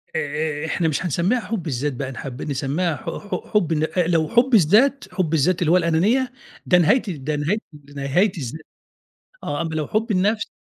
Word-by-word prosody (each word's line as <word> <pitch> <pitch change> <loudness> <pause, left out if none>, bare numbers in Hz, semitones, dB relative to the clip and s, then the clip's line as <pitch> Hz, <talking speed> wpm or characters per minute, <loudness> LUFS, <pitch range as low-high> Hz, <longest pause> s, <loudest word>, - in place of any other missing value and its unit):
آآ - - +1 0.4
آآ - - -2
إحنا 165 +1 0
مش 155 - -1
هنسمّيها 180 - +1
حُب 210 -4 -4
الذات 140 +1 -1
بقى 135 +1 -4
نحب 125 +1 -7
نسمّيها 150 +4 -1
ح - - -12
ح 205 - -5
حُب 180 -7 +2
ال 160 +3 0
لو 160 -2 +2
حُب 245 +2 +3
الذات، 220 - +4
حُب 170 -5 -1
الذات 165 +4 +2
اللي 160 - +2
هو 180 - +6
الأنانية 190 +10 +2 0.3
ده 180 - +5
نهاية 180 +9 +4 0.2
نهاية 150 +7 -1 0.4
نهاية 145 +9 +1
الز 130 -5 -5 0.9
آه، 145 +3 -2
أمّا 160 -1 -4
لو 155 -2 -1
حُب 220 +2 -1
النَفْس 210 +3 +1
170 Hz, 180 wpm, -22 LUFS, 150-205 Hz, 0.9 s, هو